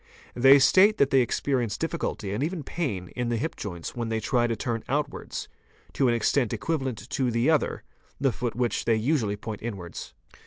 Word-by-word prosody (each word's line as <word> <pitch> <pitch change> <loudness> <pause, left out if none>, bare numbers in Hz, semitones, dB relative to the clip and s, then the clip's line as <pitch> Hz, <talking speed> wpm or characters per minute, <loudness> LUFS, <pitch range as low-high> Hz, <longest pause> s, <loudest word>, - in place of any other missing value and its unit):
'They 135 +3 +7
state 195 +9 +5
that 140 - +3
they 135 - +5
experience 125 -1 0
difficulty 165 - -3
and 110 +7 -1
even 165 0 -3
pain 115 - -3
in 120 -1 -3
the 120 - 0
hip 160 +9 -3
joints 85 -5 -6
when 120 -2 -3
they 110 0 0
try 120 +2 +1
to 115 - -1
turn 115 -1 -3
outwards, 145 +1 -3 0.5
to 135 - +2
an 120 - +3
extent 120 +1 +1
equi 165 - -1
valent 130 -7 -4
to 130 -3 0
the 115 +6 +2
other, 155 - 0 0.4
the 135 -1 +2
foot 120 0 -3
which 120 -1 -1
they 115 - +3
usually 110 -3 0
point 105 0 -6
inwards. 95 -7 -7
120 Hz, 195 wpm, -26 LUFS, 110-140 Hz, 0.5 s, They